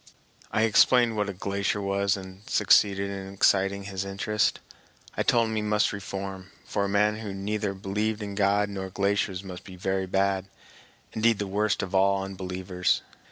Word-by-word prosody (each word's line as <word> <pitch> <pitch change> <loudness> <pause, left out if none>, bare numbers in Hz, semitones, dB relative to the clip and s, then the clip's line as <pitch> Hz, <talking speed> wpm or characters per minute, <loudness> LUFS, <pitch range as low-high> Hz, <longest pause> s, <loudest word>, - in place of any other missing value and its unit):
I 110 - +2
explained 115 +1 +4
what 105 -1 0
a - - -1
glacier 100 +2 -1
was 100 0 0
and 95 0 -10
succeeded 100 -1 +3
in 95 -1 -6
exciting 100 0 +2
his 95 -1 -4
interest. 100 +2 0 0.6
I - - 0
told 115 -2 +3
him 110 - -3
he 110 - 0
must 105 0 +1
reform, 95 -1 -6 0.2
for 100 - -1
a - - -2
man 105 +1 +2
who 105 -3 -6
neither 100 0 -2
believed 105 +3 -2
in 100 -1 -5
God 100 +1 +2
nor 95 -1 -5
glaciers 100 -1 0
must 90 -2 -8
be 95 -2 -11
very 95 +1 -1
bad, 95 0 0 0.7
indeed 115 0 +3
the 100 - -2
worst 105 +3 0
of 95 - -6
all 95 0 +3
unbelievers. 95 -1 -2
100 Hz, 170 wpm, -27 LUFS, 95-105 Hz, 0.7 s, explained